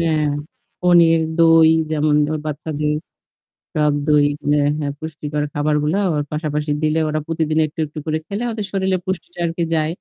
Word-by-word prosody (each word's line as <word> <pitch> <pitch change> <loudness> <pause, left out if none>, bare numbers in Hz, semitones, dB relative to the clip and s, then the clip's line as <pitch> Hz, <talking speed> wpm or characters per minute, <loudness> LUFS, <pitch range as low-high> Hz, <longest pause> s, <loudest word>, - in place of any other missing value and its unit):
হ্যাঁ। 155 -2 +1 0.6
পনির, 170 -2 +5 0.2
দই 165 -1 +6 0.2
যেমন 150 -1 +1
ধরো 155 0 -2
বাচ্চাদের 150 0 -2 0.8
টক 150 -1 +2
দই, 150 -1 +4 0.2
হ্যাঁ, 145 -1 +3
হ্যাঁ, 145 -2 -2
পুষ্টিকর 150 -1 -4
খাবারগুলা 150 +3 0
আবার 150 -4 0
পাশাপাশি 150 -1 -2
দিলে 155 +1 +2
ওরা 155 0 -1
প্রতিদিন 160 -1 -1
একটু-একটু 155 0 -5
করে 155 0 0
খেলে 205 +3 -3
ওদের 215 -2 -4
শরীরে 190 -1 0
পুষ্টিটা 175 -2 -5
আরকি 170 0 -2
যায়। 155 -1 +1
155 Hz, 150 wpm, -20 LUFS, 150-165 Hz, 0.8 s, দই